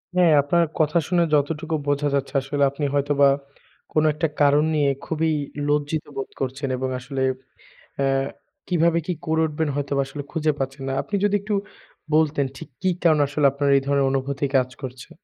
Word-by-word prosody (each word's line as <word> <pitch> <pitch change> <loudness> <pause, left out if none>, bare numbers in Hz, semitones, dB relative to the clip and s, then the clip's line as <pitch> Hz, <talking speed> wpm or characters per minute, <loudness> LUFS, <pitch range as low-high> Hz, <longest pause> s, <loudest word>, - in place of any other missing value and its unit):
হ্যাঁ, 180 -3 +5
আপনার 170 +4 +2
কথা 155 +1 +2
শুনে 175 -1 +3
যতটুকু 155 +2 +1
বোঝা 145 0 +1
যাচ্ছে, 140 -1 -2
আসলে 140 +1 -1
আপনি 145 +1 -3
হয়তোবা, 140 0 +3 0.7
কোনো 155 0 +3
একটা 160 +2 0
কারণ 145 +1 +5
নিয়ে, 145 -2 +3 0.2
খুবই 160 0 0 0.4
লজ্জিত 150 +1 0
বোধ 135 - -4
করছেন 135 +2 -2
এবং 130 0 -2
আসলে 135 +1 -5 0.8
এ - - +2 0.6
কিভাবে 170 -1 +3
কি 180 - 0
করে 160 0 +1
উঠবেন, 155 0 -2
হয়তোবা 140 -1 -1
আসলে 145 +1 -6
খুঁজে 155 -2 +1
পাচ্ছেন 135 0 -4
না। - - -1
আপনি 210 - -8
যদি 205 0 +2
একটু 210 +1 -2 0.6
বলতেন, 155 -2 +3
ঠিক 160 - -9
কি 185 - +2
কারণে 155 -3 +4
আসলে 145 0 +2
আপনার 140 0 0
এই 135 - +4
ধরনের 140 -1 +2
অনুভূতি 135 +1 -1
কাজ 130 -1 +2
করছে। 130 -1 -8
145 Hz, 175 wpm, -23 LUFS, 140-160 Hz, 0.8 s, হ্যাঁ